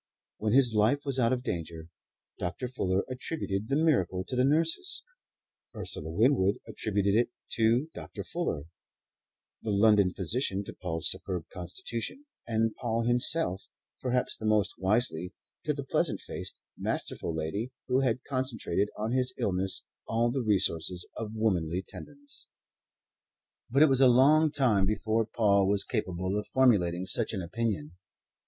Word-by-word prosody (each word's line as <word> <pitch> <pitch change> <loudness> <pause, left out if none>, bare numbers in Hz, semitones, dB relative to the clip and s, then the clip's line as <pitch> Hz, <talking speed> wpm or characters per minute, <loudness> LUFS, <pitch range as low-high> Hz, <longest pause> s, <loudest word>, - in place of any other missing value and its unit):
When 110 0 0
his 125 -3 +5
life 110 +8 +2
was 135 -2 +1
out 115 -1 +3
of 125 -1 -1
danger, 80 -5 -4 0.5
Dr. 90 +9 -3
Fuller 95 -6 0
attributed 125 -5 -3
the 140 - +2
miracle 125 - +2
to 130 - -2
the 125 - +3
nurses; 165 - +1 0.7
Ursula 90 -6 -3
Winwood 100 - +3
attributed 100 -2 0
it 120 +3 +3 0.2
to 115 +5 +2
Dr. - - -7
Fuller; 170 - -3 1.0
the 110 - -4
London 100 -2 +4
physician 100 - -1
to - - -8
Paul's 80 -3 0
superb 95 -3 -3
constitution; 115 - -4 0.2
and 115 -1 +1
Paul 115 -1 -1
himself, 120 - +1 0.3
perhaps 125 -1 0
the 110 - -4
most 105 -2 +2
wisely, 95 -3 +1 0.3
to 150 - +1
the 140 - -4
pleasant 135 - 0
faced, - - -6 0.2
masterful 80 - -3
lady 90 +10 -3 0.2
who 125 +1 +2
had 125 -2 0
concentrated 130 -6 -1
on 110 +2 -2
his 125 0 +1
illness 95 0 -1 0.2
all 115 +1 +1
the 130 +1 -1
resources 90 -5 +1
of 110 -1 -5
womanly 90 -5 0
tenderness. 145 -1 -6 1.2
But 140 +5 +5
it 155 - +6
was 135 0 +4
a 130 - +8
long 145 +5 +5
time 120 -10 +2
before 110 +2 0
Paul 100 -4 +3
was 100 0 +2
capable 95 -3 -2
of 105 - -7
formulating 95 -9 +3
such - - +2
an 95 -4 -3
opinion. 90 -4 -2
110 Hz, 145 wpm, -29 LUFS, 95-130 Hz, 1.2 s, a